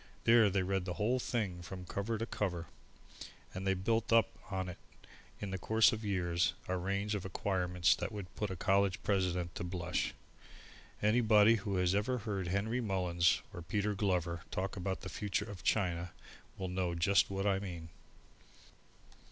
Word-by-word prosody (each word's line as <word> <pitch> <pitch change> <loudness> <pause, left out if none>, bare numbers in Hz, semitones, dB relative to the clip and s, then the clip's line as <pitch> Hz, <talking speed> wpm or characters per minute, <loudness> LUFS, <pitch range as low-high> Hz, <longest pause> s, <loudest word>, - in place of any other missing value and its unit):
There 115 -2 +6
they 95 -1 +1
read 95 0 -1
the 90 -2 -3
whole 120 +5 +1
thing 100 -8 -2
from 90 +1 -7
cover 100 +5 -2
to 115 - -2
cover, 90 -7 -2 0.9
and 95 +1 -4
they 95 - +3
build 110 +5 0
up 115 -1 +5 0.2
on 95 -2 -2
it, 90 - -7 0.6
in 100 -2 -4
the 95 - -3
course 110 +5 +4
of 110 0 -4
years, 85 -4 +1
a 95 - 0
range 100 +3 -1
of 100 -3 -2
acquirement 90 -2 +1
that - - -3
would 100 -4 -7
put 105 - -2
a 95 - -4
college 95 +1 +2
president 90 -3 0
to - - -6
the 85 - -3
blush. 90 -1 -2 0.9
Anybody 110 0 +5
who 100 -1 -3
has 90 0 +2
ever 110 +6 +1
heard 100 -5 -3
Henry 105 +7 0
Mullins 90 -5 +2
and 85 -3 -8
Peter 105 +2 0
Glover 90 -4 0
talk 95 +1 -3
about 95 0 -3
the - - -6
future 100 -1 -2
of 100 -4 -8
China 90 -5 0 0.4
will 95 - -3
know 90 -1 -1
just 100 +4 +3
what 95 0 -2
I 100 -1 +2
mean. 85 -4 -6
95 Hz, 175 wpm, -34 LUFS, 90-105 Hz, 0.9 s, There